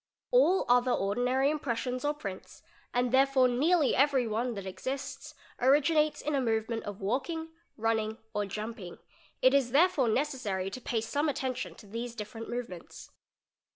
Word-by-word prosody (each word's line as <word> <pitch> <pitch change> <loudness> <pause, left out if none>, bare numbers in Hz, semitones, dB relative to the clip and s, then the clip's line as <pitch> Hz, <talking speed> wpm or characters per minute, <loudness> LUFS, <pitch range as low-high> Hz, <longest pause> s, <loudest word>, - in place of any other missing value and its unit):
All 435 -7 +4
other 245 +1 +4
ordinary 250 +7 +1
impressions 255 -3 -2
or 295 +1 0
prints, 195 -9 -8 0.3
and 245 0 +1
therefore 265 0 +4
nearly 295 +5 +3
every 270 -3 +3
'one 230 +2 -1
that 200 -1 -6
exists, 265 +8 -5 0.2
originates 300 +4 +3
in 300 - -1
a 275 - +2
movement 225 -1 -1
of 205 -1 -7
walking, 275 - -2 0.3
running, 220 -1 0 0.2
or 205 -1 -1
jump. 215 +3 -5
ing; 180 -3 -9 0.5
it 260 - +6
is 275 -3 +3
therefore 290 -5 +4
necessary 215 -8 -1
to 255 - -7
pay 230 -2 -1
some 290 +7 0
attention 260 -2 -3
to - - -15
these 230 +3 -5
different 225 +1 -7
m - - -5
ovements. 230 -8 -7
250 Hz, 155 wpm, -30 LUFS, 220-280 Hz, 0.5 s, it